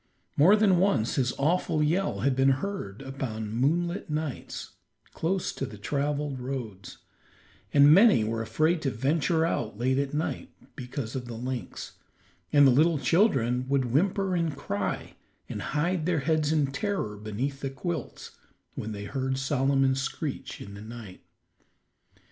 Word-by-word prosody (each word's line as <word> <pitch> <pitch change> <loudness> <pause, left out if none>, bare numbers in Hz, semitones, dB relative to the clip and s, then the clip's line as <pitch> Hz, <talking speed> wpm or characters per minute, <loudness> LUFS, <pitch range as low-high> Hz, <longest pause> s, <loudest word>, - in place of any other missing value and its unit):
More 175 +9 +6
than 200 -4 +4
once 185 - +2
his 130 -2 +1
awful 155 +1 +1
yell 155 - 0
had 135 +2 +2
been 135 +1 +4
heard 135 - -5
upon 120 -6 -5
moonlight 170 - 0
nights 150 -3 -4 0.4
close 180 +3 -1
to 135 - -4
the 105 - -10
traveled 145 +4 -2
roads, 120 -8 -6 0.7
and 145 +1 +7
many 200 - +6
were 115 +1 -2
afraid 155 +10 +1
to 140 - 0
venture 160 +7 +1
out 110 -10 -2
late 130 +3 +1
at 140 -1 -1
night 150 +2 -3 0.3
because 125 -3 -5
of 130 -2 -3
the 120 - -6
lynx, 125 +2 -6 0.5
and 145 -1 +6
the 135 - +7
little 155 +5 +4
children 130 - +2
would 135 -4 +1
whimper 190 +5 +1
and 165 -5 -1
cry, 100 -7 -3 0.3
and - - -5 0.2
hide 170 +1 0
their 170 -5 +1
heads 155 0 +1
in 150 -4 +1
terror 165 - -2
beneath 110 +7 -4
the 140 - -3
quilts, 160 +2 -5 0.4
when 110 +1 -5
they 100 0 -6
heard 130 +3 -2
Solomon's 135 0 +2
screech 140 +1 -4
in 100 - -9
the 100 - -9
night. 110 -4 -10
135 Hz, 150 wpm, -27 LUFS, 120-160 Hz, 0.7 s, and